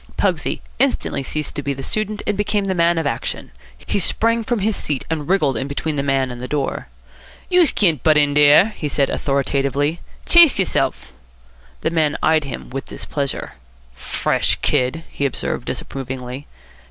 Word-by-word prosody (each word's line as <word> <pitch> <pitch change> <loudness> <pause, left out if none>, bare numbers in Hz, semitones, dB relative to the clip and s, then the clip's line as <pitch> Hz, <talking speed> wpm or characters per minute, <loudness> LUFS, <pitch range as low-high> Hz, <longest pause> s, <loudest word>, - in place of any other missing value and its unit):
Pugsy - - 0 0.2
instantly - - 0
ceased 150 +2 -4
to - - -3
be 140 0 -3
the 135 - -7
student 215 +5 -3
and 210 - 0
became 205 0 0
the 190 - 0
man 170 -1 +2
of 165 - -1
action. 115 - -3 0.3
He 75 - -2
sprang 230 +5 +2
from 240 +2 -1
his 210 +1 0
seat 145 -4 -3
and 155 -1 -3
wriggled 155 -8 +2
in 135 - -3
between 150 +2 -3
the 140 - 0
man 135 -2 0
and 120 0 -8
the 125 - -5
door. 140 0 -2 0.6
"Youse 360 -3 +6
can't 165 - +2
butt 155 -1 +4
in 145 -1 +3
dere," 150 +7 +6
he 150 - -3
said 140 -1 +1
authoritatively. 140 +2 0 0.3
"Chase 340 -5 +8
yerself." 115 - -1 0.7
The - - 0
man 155 -3 +1
eyed 155 -1 +3
him 130 -2 -7
with 135 +1 -5
displeasure. 140 -3 -4 0.4
"Fresh - - 0
kid!" 130 +6 +1
he - - -6
observed 130 - -4
disapprovingly. 130 0 -6
145 Hz, 170 wpm, -20 LUFS, 135-180 Hz, 0.7 s, Chase